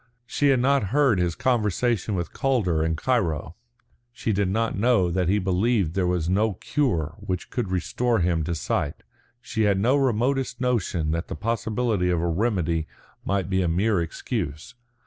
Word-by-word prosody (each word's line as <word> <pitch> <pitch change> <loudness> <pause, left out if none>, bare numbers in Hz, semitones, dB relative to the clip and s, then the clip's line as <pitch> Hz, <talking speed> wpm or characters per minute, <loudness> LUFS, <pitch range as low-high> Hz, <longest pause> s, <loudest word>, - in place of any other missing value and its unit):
She 145 +4 0
had 135 -2 +4
not 135 -2 +2
heard 130 -1 +2
his 85 -2 0
conversation 115 -3 0
with 85 -3 -3
Calder 100 -13 +1
in 80 0 0
Cairo. 85 - -1 0.6
She 115 -2 -2
did 100 0 +1
not 115 +3 0
know 100 -4 +2
that 90 0 0
he 100 - +3
believed 95 -1 +1
there 95 -1 0
was 90 -3 0
no 105 +4 +2
cure 90 - -1
which 90 -1 -4
could 120 -7 -2
restore 115 +6 0
him 85 -4 +1
to 85 - -2
sight. 75 -2 -2 0.4
She 110 -1 -3
had 100 -2 +3
no 120 +7 +3
remotest 130 0 0
notion 100 -11 0
that 85 +2 -2
the - - -5
possibility 110 -3 -1
of 90 -2 +1
a 85 - 0
remedy 85 -4 0 0.4
might 100 -2 -1
be 95 -1 +1
a 90 - +1
mere 95 +3 +1
excuse. 85 - -4
100 Hz, 170 wpm, -25 LUFS, 85-120 Hz, 0.6 s, had